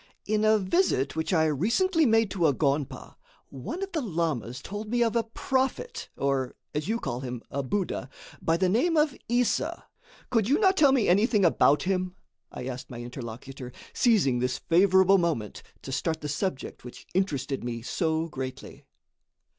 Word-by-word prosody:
"In 215 0 +1
a 215 0 +5
visit 190 - +1
which 160 +3 -2
I 160 -3 +3
recently 250 - +2
made 225 -2 +3
to 175 -5 +2
a 145 - +3
gonpa, 140 -1 -2 0.3
one 310 - -5
of 390 - -5
the 320 - -1
lamas 155 - -2
told 210 +2 -6
me 240 +1 +2
of 230 0 0
a 230 - +4
prophet, 265 - -2
or, 135 -2 -1 0.2
as 150 +1 -2
you 225 +2 0
call 120 - -3
him, 125 -2 -6
a 140 - -1
buddha, 140 -2 -2 0.3
by 165 0 +2
the 185 +1 +2
name 285 - +2
of 300 -3 +3
Issa. 245 0 0 0.5
Could 225 -3 +2
you 285 - +4
not 385 -2 +4
tell 290 -6 +5
me 260 -5 +2
anything 205 +2 +4
about 150 -3 +4
him?" 185 -1 -1 0.4
I 125 - -7
asked 130 -1 -6
my 120 - -8
interlocutor, 125 +1 -8 0.2
seizing 185 - +3
this 125 +1 0
favorable 190 +2 +4
moment 155 - -2 0.2
to 135 - -6
start 160 +4 -1
the 150 - -4
subject 150 -2 -3
which 125 - -11
interested 140 -8 -1
me 115 -1 -4
so 160 +4 -1
greatly. 130 -3 -7
175 Hz, 170 wpm, -27 LUFS, 135-225 Hz, 0.5 s, a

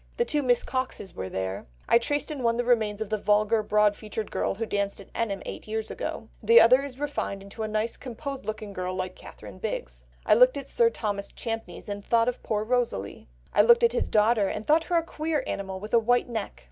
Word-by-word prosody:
The 475 - +2
two 300 -9 0
Miss 245 -3 +3
Coxes 255 -8 -3
were 95 0 -5
there; 95 -3 -4 0.2
I 235 - +6
traced 290 +6 -2
in 290 -3 -5
one 230 -1 +2
the 245 - +1
remains 220 -4 +1
of 220 -1 -4
the 215 - 0
vulgar, 210 +2 +3
broad 210 0 +3
featured 215 0 -6
girl - - -1
who 225 +3 -3
danced 200 -2 -2
at 200 - -14
Enham 205 -4 -2
eight - - -7
years 220 0 -3
ago; 225 - -5
the 230 +2 +7
other 255 +4 +6
is 270 -2 -8
refined 285 -9 -3
into 200 +3 -9
a 215 - -1
nice 215 +2 -1
composed 270 +2 -6
looking 215 -1 -5
girl 185 0 -3
like 185 0 -3
Catherine 100 -3 -12
Bigg. 65 - -3 0.3
I - - +5
looked 250 +5 +6
at 280 - -6
Sir 470 -1 +3
Thomas 205 - -4
Champneys 225 -1 -6
and 205 -1 -5
thought 230 +1 +2
of 250 - -2
poor 215 -1 -1
Rosalie; 230 - -2 0.3
I - - +6
looked 235 +2 +6
at 235 0 +4
his - - -1
daughter, 215 -1 +3
and 210 +2 -4
thought 315 +2 +3
her 350 - +1
a 330 - +2
queer 310 -3 -2
animal 190 -1 -4
with 210 +4 -9
a 235 - +7
white 245 +2 +2
neck." 225 -4 -5
220 Hz, 230 wpm, -27 LUFS, 205-245 Hz, 0.3 s, the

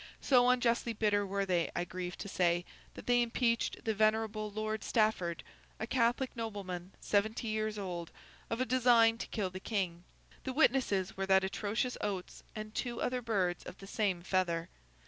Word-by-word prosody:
So 250 -2 +5
unjustly 240 -2 +2
bitter 205 -2 +1
were 200 +1 -1
they, 175 -3 +1
I 175 - 0
grieve 180 0 -5
to - - -6
say, 175 -2 +1 0.3
that - - -9
they 245 0 +4
impeached 235 0 0
the 220 - +1
venerable 215 0 +1
Lord 215 +1 -3
Stafford, 215 -7 +1 0.4
a 220 - -2
Catholic 245 +2 +1
nobleman 195 -5 -5
seventy 220 +3 0
years 215 0 -1
old, 175 -4 -4 0.4
of 230 - -2
a 255 - +2
design 240 -3 +5
to - - -4
kill 195 -5 -2
the 185 - -6
King. 185 -5 -2 0.4
The 260 - -3
witnesses 245 -9 +2
were 195 0 -2
that 190 0 +5
atrocious 210 +5 -1
Oates 190 -3 -4
and 215 0 -6
two 240 -1 -3
other 250 0 -1
birds 195 -7 0
of - - -9
the 195 - -11
same 195 -4 -1
feather. 175 -3 0
215 Hz, 170 wpm, -33 LUFS, 185-230 Hz, 0.4 s, So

